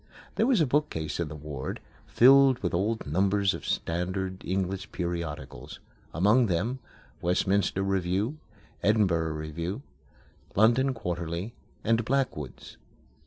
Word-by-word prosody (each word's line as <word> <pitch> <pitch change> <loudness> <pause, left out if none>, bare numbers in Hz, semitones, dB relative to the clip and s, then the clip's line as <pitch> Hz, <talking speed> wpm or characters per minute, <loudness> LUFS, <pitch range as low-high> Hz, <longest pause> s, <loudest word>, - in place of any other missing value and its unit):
There 225 - +2
was 255 -6 +4
a - - +4
bookcase 125 - -1
in 85 - 0
the 75 - -7
ward, 75 -3 -6 0.3
filled 135 +1 +6
with 90 - -1
old 105 +6 0
numbers 95 +5 +2
of - - -7
standard 95 +2 -2
English 95 0 -2
periodicals; 85 -4 -5 0.3
among 105 - +4
them: 110 +9 -1 0.4
Westminster 95 +2 +1
Review, 95 - -1 0.4
Edinburgh 90 -7 +2
Review, 85 - -4 0.7
London 120 +6 +4
Quarterly, 90 +1 -4 0.3
and 115 +1 +2
Blackwood's. 105 - -3
95 Hz, 115 wpm, -28 LUFS, 85-115 Hz, 0.7 s, filled